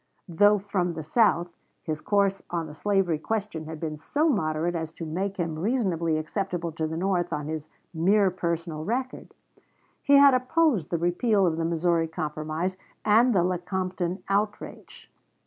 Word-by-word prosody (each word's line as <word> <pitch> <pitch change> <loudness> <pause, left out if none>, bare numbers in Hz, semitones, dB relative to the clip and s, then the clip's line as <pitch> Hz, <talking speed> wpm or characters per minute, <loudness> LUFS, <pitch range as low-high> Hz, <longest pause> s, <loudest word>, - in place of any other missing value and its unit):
Though 205 +5 +5
from 190 -3 -2
the 160 - -5
South, 175 -1 +2 0.3
his 155 -2 -4
course 200 -2 +1
on 170 -2 -2
the 150 - -9
slavery 190 -2 +1
question 205 -4 -3
had 160 0 -7
been 155 -2 -4
so 300 - 0
moderate 165 - 0
as 160 -2 -3
to 165 - -7
make 190 +5 -3
him 165 -3 -2
reasonably 175 -7 0
acceptable 170 +1 -3
to 160 0 -2
the 160 +1 -4
North 180 -1 0
on 150 -2 -3
his 155 0 -5 0.2
mere 190 +4 +3
personal 170 -3 -3
record. 255 +7 -4 0.7
He 285 - +4
had 280 -1 +8
opposed 255 - +2
the 170 - 0
repeal 190 +5 +2
of 165 -2 0
the 165 - -1
Missouri 165 0 +1
Compromise 155 +3 -3 0.3
and 230 +4 +5
the 175 - +4
Lecompton 180 0 -2
outrage. 205 +2 -3
175 Hz, 160 wpm, -26 LUFS, 160-200 Hz, 0.7 s, had